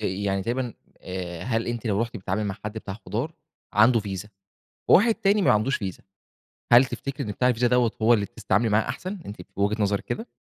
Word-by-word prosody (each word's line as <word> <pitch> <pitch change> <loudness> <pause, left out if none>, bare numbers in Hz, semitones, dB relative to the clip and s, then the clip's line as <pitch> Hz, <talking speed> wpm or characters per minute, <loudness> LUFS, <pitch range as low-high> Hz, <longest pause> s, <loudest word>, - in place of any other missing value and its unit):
يعني 95 -1 -1
تقريبًا 120 +1 -2 0.3
آآ 90 -2 -5
هل 115 -1 -1
أنتِ 120 -1 -3
لو 100 -1 +1
رُحتِ 115 0 -5
بتتعاملي 95 +2 -2
مع 100 -2 -3
حد 105 - -3
بتاع 110 -3 -6
خضار 130 +10 -2 0.4
عنده 115 +3 +5
فيزا، 100 0 -5 0.6
وواحد 225 +4 +6
تاني 200 +1 +2
ما - - +5
عندوش 110 +6 +2
فيزا، 95 -3 -5 0.7
هل 125 +2 +9
تفتكري 140 +2 -5
إن - - -2
بتاع 125 +5 +1
الفيزا 120 0 +2
دَوَّة 125 -2 +3
هو 115 +2 +6
اللي 105 -3 +2
بتس 110 +1 -14
تتعاملي 105 +5 +3
معاه 110 +2 +2
أحسن، 185 +10 -4
أنتِ 100 - -7
في - - -15
وجهة 105 +2 +1
نظرِك 100 0 0
كده؟ 225 +3 -4
110 Hz, 205 wpm, -25 LUFS, 100-125 Hz, 0.7 s, هل